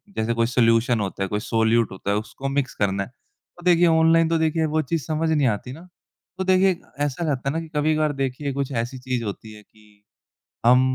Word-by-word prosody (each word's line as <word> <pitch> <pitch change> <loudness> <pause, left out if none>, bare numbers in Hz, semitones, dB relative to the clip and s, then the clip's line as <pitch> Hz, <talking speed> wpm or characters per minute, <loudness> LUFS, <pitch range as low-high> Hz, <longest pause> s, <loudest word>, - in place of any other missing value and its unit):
जैसे 110 +1 0
कोई 115 0 +1
सॉल्यूशन 115 -1 +3
होता 95 -1 -3
है, - - -1
कोई 105 - -1
सोल्यूट 115 0 +1
होता 95 +1 -4
है, 100 - +1
उसको 120 +5 -5
मिक्स 140 -1 -1
करना 100 -1 0
है, - - -10
तो 170 +6 -23
देखिए 175 -1 +5
ऑनलाइन 165 0 +4
तो 165 - +2
देखिए 160 0 +1
वो 155 +1 0
चीज़ 155 +1 -2
समझ 160 +1 -1
नहीं 145 -4 +3
आती 115 +3 -2
ना? 170 +5 -12 0.5
तो 190 - -1
देखिए 185 -1 +3 0.3
ऐसा 145 +4 -3
रहता 135 0 -1
है - - -2
ना 165 - -1
कि 165 - -9
कभी-कभार 155 0 +1
देखिए 135 +1 -3
कुछ 140 0 -3
ऐसी 120 +2 -3
चीज़ 125 -2 -3
होती 110 +1 -7
है 105 - -13
कि 105 -1 -25 0.6
हम 125 +1 +7
130 Hz, 220 wpm, -23 LUFS, 115-160 Hz, 0.6 s, हम